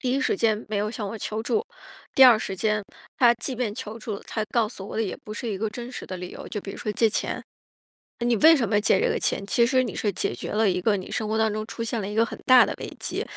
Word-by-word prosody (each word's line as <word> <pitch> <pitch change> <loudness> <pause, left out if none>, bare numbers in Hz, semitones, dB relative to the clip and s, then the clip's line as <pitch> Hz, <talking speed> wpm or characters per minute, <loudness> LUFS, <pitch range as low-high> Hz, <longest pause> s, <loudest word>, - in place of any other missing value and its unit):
第 250 - -1
一 275 - +1
时 260 - +1
间 220 0 +1
没 215 - -1
有 210 +1 -1
向 220 -3 -5
我 220 - -6
求 215 +1 -3
助， 430 - 0 0.5
第 265 - +6
二 240 -4 +8
时 195 -3 -4
间， 210 +1 0 0.4
他 240 -2 +6
即 250 +2 -4
便 225 -4 -2
求 220 -1 -7
助， 215 -2 -5
他 220 - -4
告 230 -3 +2
诉 195 -4 -9
我 - - -6
的 225 - +1
也 195 - -3
不 215 - -7
是 235 - -5
一 195 -3 -3
个 220 +1 -1
真 240 +3 -7
实 - - -7
的 185 - -5
理 180 0 -7
由。 - - -9
就 210 - -4
比 195 - -7
如 - - -8
说 210 - -3
借 225 +1 +3
钱， - - -2 0.8
呃， 235 - -3
你 240 -1 +3
为 320 +6 +8
什 240 -6 0
么 205 -1 +2
借 - - +3
这 - - +2
个 - - 0
钱， 195 - 0
其 235 +4 +2
实 255 +1 +3
你 230 - -4
是 205 - 0
解 175 - -2
决 - - -6
了 215 0 +2
一 180 -1 +1
个 205 +1 +2
你 185 - -8
生 215 - -2
活 220 - 0
当 220 -1 +2
中 215 0 -3
出 230 - -5
现 230 -1 -2
了 195 - -4
一 210 - -5
个 225 - +4
很 - - -8
大 255 -1 +8
的 - - -3
危 - - -5
机， - - -3
220 Hz, 330 characters per minute, -25 LUFS, 210-235 Hz, 0.8 s, 二